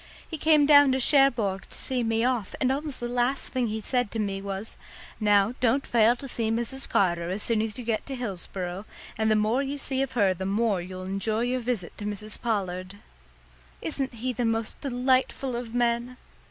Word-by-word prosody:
He 320 - -6
came 305 -1 +5
down 285 -2 +7
to 260 - +1
Cherbourg 245 -8 +3
to - - -7
see 255 -2 0
me 225 0 +1
off, 245 -5 0
and 255 - +2
almost 285 0 -3
the 240 - -3
last 245 +2 0
thing 255 -2 +1
he 220 0 -3
said 245 0 0
to 225 - -5
me 200 -2 -2
was, 195 +2 -5 0.4
'Now, 205 0 +3
don't 255 +3 +2
fail 235 0 +4
to 275 +3 -8
see 230 -3 -1
Mrs. 235 +4 -1
Carter 175 -3 +1
as 195 +3 -3
soon 230 -2 +1
as 220 +1 -3
you 250 - -6
get 225 -2 0
to 275 - -4
Hillsboro; 190 -4 -4 0.3
and 220 0 +1
the 215 - +4
more 215 +5 +2
you 280 +1 -3
see 270 -1 -1
of 270 -1 -2
her 200 -5 +3
the 185 - -6
more 205 -1 +1
you'll 185 +1 -7
enjoy 195 +4 -1
your 250 +1 0
visit 235 -7 -3
to 205 - -5
Mrs. 210 +1 -3
Pollard.' 190 -4 -2 0.8
Isn't 265 -3 -3
he 250 +3 -2
the 245 - -2
most 225 -1 -1
delightful 260 0 0
of 240 -1 -5
men?" 240 +1 0
230 Hz, 205 wpm, -27 LUFS, 205-255 Hz, 0.8 s, down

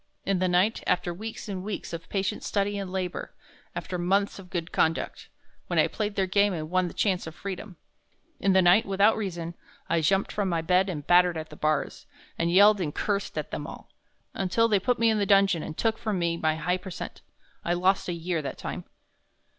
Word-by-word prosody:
In 195 -2 +1
the 185 - +2
night, 185 +5 +2
after 180 -1 +1
weeks 220 +6 -7
and 190 -3 -4
weeks 205 -3 -5
of 165 0 -7
patient 195 -1 -1
study 205 0 0
and 195 -2 -5
labor 185 -1 -4 0.4
after 180 -2 -4
months 195 +3 +1
of 185 -2 -12
good 170 -3 -3
conduct, 160 +1 0 0.4
when - - -2
I - - +6
played 210 -1 -3
their 195 - +2
game 200 +2 +3
and 155 -1 -5
won 185 0 +2
the - - -9
chance 185 -5 0
of 160 - -8
freedom. 195 0 -7 0.6
In 195 - +3
the 190 0 +5
night, 180 +5 +6
without 200 +3 +4
reason, 175 -5 -4 0.3
I 165 -1 +1
jumped 195 +5 +2
from 205 -2 -1
my 165 -2 0
bed 185 +3 +3
and 150 -5 -5
battered 175 -1 +5
at 155 0 -6
the - - -9
bars 155 0 -1 0.3
and 170 0 0
yelled 200 +2 +6
and 150 -4 -3
cursed 200 -1 -2
at - - -3
them - - -4
all, - - -10 0.4
until 195 +4 +2
they 210 -3 +3
put 245 +6 +1
me 230 0 +4
in 215 - +1
the 200 - 0
dungeon 195 -4 +4
and 155 - -7
took 225 -1 0
from 215 -4 -1
me 170 -1 0
my 155 -2 +1
high 180 +3 0
percent. 185 0 -8 0.4
I 175 - +1
lost 185 +1 +2
a - - -1
year 170 0 -2
that 140 - -5
time." - - -6
185 Hz, 215 wpm, -27 LUFS, 170-200 Hz, 0.6 s, I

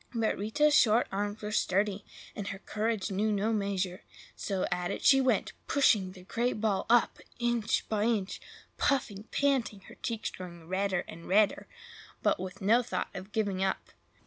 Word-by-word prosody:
But 225 -1 +1
Rita's 295 +9 +2
short 230 -3 +5
arms 205 +2 -3
were 210 - -3
sturdy, 205 0 +1 0.3
and 200 -1 -5
her 195 - -4
courage 215 0 -2
knew 210 +3 +1
no 210 +2 +1
measure; 195 -3 -1 0.3
so 195 -3 -2
at 180 0 -1
it - - -4
she 270 -1 +7
went, 260 -1 +1
pushing 210 -10 +3
the 185 -1 -13
great 235 +4 -1
ball 210 -3 0
up, 240 0 +3 0.2
inch 240 -2 0
by 215 -1 0
inch; 215 -5 -1 0.4
puffing, 220 -7 0
panting, 260 -7 0
her - - -14
cheeks 230 -2 -3
growing 170 -3 -10
redder 190 0 0
and 165 +1 -10
redder, 205 +2 +3 0.6
but - - +2
with 185 0 -7
no 225 +5 +5
thought 240 - -3
of 190 +2 -8
giving 200 -4 0
up. 190 - -2
205 Hz, 170 wpm, -30 LUFS, 190-225 Hz, 0.6 s, she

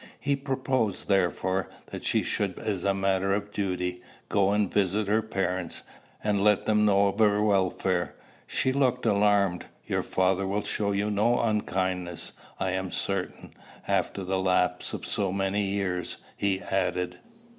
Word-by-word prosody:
He 140 -1 +1
proposed, 130 -6 -1
therefore, 95 -1 +1 0.2
that - - -6
she - - +2
should, - - -1
as 100 -4 -2
a 100 - +3
matter 95 0 +1
of 105 0 -4
duty, 90 -3 -2 0.3
go 100 -1 +3
and 105 -2 +1
visit 100 +1 +1
her 110 +2 +3
parents, 95 -5 -2 0.4
and 105 -2 +1
let 105 -1 +4
them 105 -1 +3
know 100 -1 +4
of 100 - -5
her 105 -1 +4
welfare. 95 -3 +1 0.3
She 130 - +1
looked 125 -3 +1
alarmed. 100 -4 +2 0.2
"Your - - 0
father 95 +1 +1
will 100 +2 -1
show 100 0 0
you 100 +1 0
no 110 +4 +2
unkindness, 95 -5 -1 0.3
I 95 -1 0
am 95 0 -2
certain, 100 -1 -3 0.3
after 100 - 0
the 95 +1 -1
lapse 90 -1 +1
of - - -5
so 100 -3 0
many 95 +1 0
years," 95 -3 -2 0.2
he 100 -2 0
added. 90 -1 -1
100 Hz, 155 wpm, -27 LUFS, 95-105 Hz, 0.4 s, let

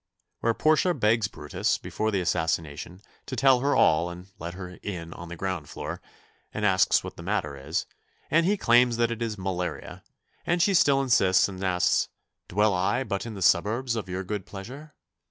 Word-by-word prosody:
Where 115 -1 +1
Portia 155 +3 +3
begs 110 -3 +2
Brutus, 75 -6 -2
before 110 - -3
the 100 -3 0
assassination, 80 0 -2 0.3
to 130 - -4
tell 135 -1 +5
her 140 +3 +1
all 80 +2 +4
and 90 +2 -10
let 85 +2 -6
her 90 -1 -9
in 85 -5 -6
on 85 - -9
the 85 - -6
ground 85 -4 -4
floor, - - -6 0.5
and 105 - -2
asks 95 -2 +3
what - - -8
the - - -8
matter 85 -6 -2
is, 70 +4 -3 0.5
and 165 +1 +4
he 200 +4 +2
claims 120 -4 +4
that 120 0 +2
it 115 0 -5
is 110 -2 -2
malaria, 90 -2 -4 0.4
and 175 +1 0
she 195 +4 +3
still 140 -7 +4
insists 95 -8 +4
and 95 -1 -7
asks, 90 -1 +2 0.4
"Dwell 105 +2 +2
I 95 +8 +1
but 100 -2 -3
in 110 - -6
the 95 - -3
suburbs 115 +8 +2
of 105 -4 -4
your 95 +1 -3
good 100 0 -5
pleasure?" 130 +10 -9
100 Hz, 190 wpm, -26 LUFS, 90-120 Hz, 0.5 s, tell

